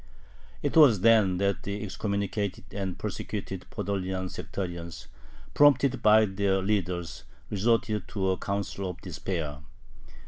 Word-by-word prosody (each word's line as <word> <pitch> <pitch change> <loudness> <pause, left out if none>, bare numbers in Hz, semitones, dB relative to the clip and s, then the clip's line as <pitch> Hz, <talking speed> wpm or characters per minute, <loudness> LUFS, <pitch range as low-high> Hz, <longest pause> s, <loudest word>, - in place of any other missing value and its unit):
It - - -1
was 135 - +7
then 110 -4 +5
that 100 0 0
the 100 +1 -4
excommunicated 100 0 -2
and 95 -2 -3
persecuted - - -5
Podolian 95 -2 -3
sectarians, 85 -3 -6 0.5
prompted 140 -2 +4
by 110 0 +6
their 95 -1 0
leaders, 90 -4 -2 0.3
resorted 110 +1 +1
to 95 -1 -1
a 95 - -1
counsel 100 -1 -3
of 90 - -7
despair. 80 -4 -4
100 Hz, 115 wpm, -28 LUFS, 95-105 Hz, 0.5 s, was